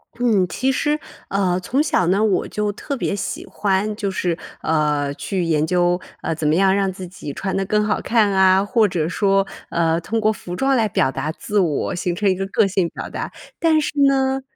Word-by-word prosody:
嗯， 220 -7 +2
其 260 +8 0
实， 295 +3 0 0.3
呃 185 -2 +1
从 265 +10 0
小 180 - +1
呢， 195 +4 +2
我 200 -4 +1
就 210 -1 -2
特 280 +7 -5
别 200 - -1
喜 195 - -4
欢 205 +1 -1
就 205 -2 -2
是， 175 -3 -1 0.3
呃， 150 -3 +1
去 185 +4 -3
研 155 -2 +1
究， 180 0 +2 0.2
呃， - - -1
怎 155 -1 -2
么 155 - +3
样 195 +1 +4
让 195 -1 +1
自 185 -1 -8
己 170 -5 -8
穿 190 -1 -3
得 195 - +1
更 210 +2 +1
好 215 - 0
看 220 -3 +2
啊， 190 0 +4
或 225 -1 +3
者 165 -4 -1
说， 195 +1 +2 0.2
呃， 165 0 +1
通 225 +6 -2
过 215 0 +3
服 175 -2 -7
装 270 +3 +2
来 225 -3 +2
表 160 -9 +1
达 155 +3 -3
自 210 +1 -2
我， 160 -6 0
形 175 0 -2
成 200 +1 +1
一 185 - +2
个 195 +1 -3
个 200 - +2
性 185 -3 0
表 - - -7
达。 - - -5 0.3
但 320 -2 +3
是 - - -2 0.2
呢 265 0 +1
195 Hz, 230 characters per minute, -21 LUFS, 175-215 Hz, 0.3 s, 样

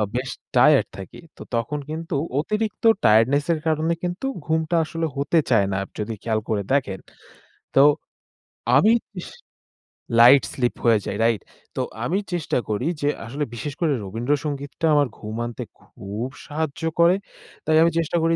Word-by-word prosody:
বেশ 130 +1 -2 0.3
টায়ারড - - +5
থাকি। 95 -2 -9 0.2
তো - - -13
তখন 115 +6 -2
কিন্তু 160 0 -4 0.2
অতিরিক্ত 215 +6 -2 0.2
টায়ার্ডনেস 120 +7 +4
এর 160 - -2
কারণে 160 +1 +1
কিন্তু 180 +7 -3 0.2
ঘুমটা 160 +1 0
আসলে 165 +1 -3
হতে 145 +4 +2
চায় 110 -5 +4
না। - - 0 0.2
যদি 105 +2 -3
খেয়াল 110 -2 0
করে 105 -2 0
দেখেন। 125 -9 0 0.8
তো - - +6 1.0
আমি 210 +11 +6 0.2
তিশ 180 - -7 0.9
লাইট 125 +3 +8
স্লিপ 125 -2 0
হয়ে 115 -2 +5
যায় - - -3
রাইট? 115 -3 +2 0.4
তো - - -1 0.2
আমি 175 +9 0
চেষ্টা 175 -3 -1
করি 110 +6 -1 0.2
যে 145 - +2 0.2
আসলে 140 +6 -3
বিশেষ 145 +5 -5
করে 165 -4 +2
রবীন্দ্র 115 +8 -2
সঙ্গীতটা 145 +2 -3
আমার 145 -2 +3
ঘুম 110 +1 -6
আনতে 120 -2 -5 0.2
খুব 105 +5 -6 0.2
সাহায্য 155 0 -4 0.2
করে 170 +2 +6 0.5
তাই 155 0 +2
আমি 165 - +5
চেষ্টা 165 +1 0
করি 165 0 +2
145 Hz, 155 wpm, -23 LUFS, 115-160 Hz, 1.0 s, লাইট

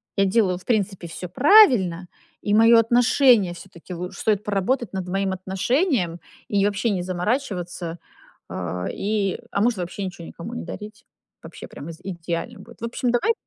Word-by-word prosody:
я 195 -1 +3
делаю, 190 -3 +2
в 180 - -15
принципе, 195 -6 -1
всё 180 +2 -7
правильно, 200 - +5 0.3
и 205 - -1
мое 230 +1 +7
отношение 240 -4 +4
всё-таки 180 0 -11
лучш 180 +2 -6
стоит 210 -1 +1
поработать 210 +2 -1
над 185 -1 -4
моим 195 0 0
отношением 190 - 0 0.3
и 200 -1 +2
вообще 205 +3 0
не 190 -3 0
заморачиваться, 180 -3 -3 0.5
а, 90 0 -4
и 200 -2 -1
а, - - -1
может, 230 -4 +2
вообще 185 +3 -4
ничего 175 -2 -7
никому 220 +8 -8
не 240 - -5
дарить, 210 0 -9 0.4
вообще - - -10
прямо 150 - -9
из 165 - -13
идеально 170 -1 -5
будет. 235 +4 -14
В - - -2
общем, 240 +1 -1
давай 425 - +2
195 Hz, 165 wpm, -23 LUFS, 180-230 Hz, 0.5 s, мое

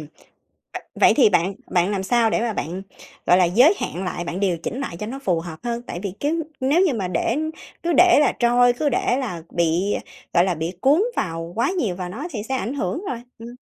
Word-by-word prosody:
v 150 0 -15 0.8
vậy - - +6
thì 270 - +6
bạn 180 +2 +1 0.2
bạn 175 +2 +2
làm 200 -2 -1
sao 230 +2 +2
để - - +1
mà 235 -1 -1
bạn, 180 -1 -4 0.4
gọi 180 - +6
là, 185 - +5
giới 245 - +5
hạn 185 +3 -4
lại, 175 -1 -3
bạn 175 +2 -4
điều 185 -4 +1
chỉnh 250 +10 -5
lại 220 -11 -4
cho 210 +4 -5
nó 265 +4 -5
phù 180 -11 0
hợp 165 -2 -8
hơn? 235 0 -2
Tại 175 - -5
vì 200 -3 -3
cứ 320 +3 0 0.2
nếu 285 +7 +3
như 290 - +1
mà 195 -5 -2
để 185 +8 0 0.5
cứ 340 0 0
để 355 -4 +7
là 295 - +3
trôi, 245 0 +4
cứ 290 +5 -1
để 245 -1 +1
là 180 -11 -4
bị, 170 +4 +1 0.4
gọi 175 0 +5
là, 185 -2 0
bị 160 +2 -3
cuốn 295 +8 +4
vào 165 0 -3
quá 235 - +2
nhiều 240 - -1
vào 180 -1 -5
nó 185 - -6
thì 210 -5 -4
sẽ 265 - -1
ảnh 250 +4 -3
hưởng 280 - -3
rồi. 240 - -3 0.2
Ừm. 230 +1 -9
205 Hz, 240 wpm, -22 LUFS, 175-255 Hz, 0.8 s, để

